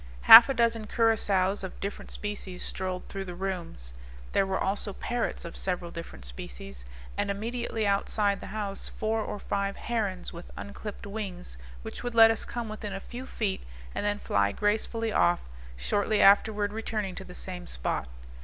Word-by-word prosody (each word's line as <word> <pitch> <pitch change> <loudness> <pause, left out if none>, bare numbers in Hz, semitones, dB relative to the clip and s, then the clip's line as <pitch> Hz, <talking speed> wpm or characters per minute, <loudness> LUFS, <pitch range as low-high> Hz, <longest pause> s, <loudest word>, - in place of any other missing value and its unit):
Half 230 +4 +12
a 270 - 0
dozen 230 -2 +1
curassows 205 -4 +2
of 190 - -7
different 200 +1 -5
species 205 -3 -5
strolled 185 -1 -3
through 195 -1 -5
the 180 -1 -7
rooms; 175 - -5 0.4
there 195 - +2
were 190 0 0
also 200 +1 0
parrots 240 0 -2
of 170 - -7
several 180 -2 -1
different 115 - -8
species, - - -8 0.3
and - - 0
immediately 225 +2 -2
outside 200 0 +1
the - - -7
house 200 -2 -3
four 220 0 -1
or 210 - -4
five 200 0 -2
herons, 205 -7 -2
with 170 +1 -9
unclipped 205 +1 -7
wings, 195 - -6 0.3
which - - -7
would 245 -1 -4
let 225 0 +9
us 225 - -2
come 240 -2 -4
within 215 -1 -5
a 195 - -3
few 250 +6 -8
feet 205 -7 -2 0.3
and - - -3
then 205 0 +1
fly 100 - +1
gracefully 220 - 0
off, 175 -3 +3 0.4
shortly 205 - +1
afterward 205 +1 +5
returning 215 -3 -2
to 195 - -7
the 180 -1 -11
same 180 -1 -6
spot. - - -2
200 Hz, 170 wpm, -28 LUFS, 185-220 Hz, 0.4 s, Half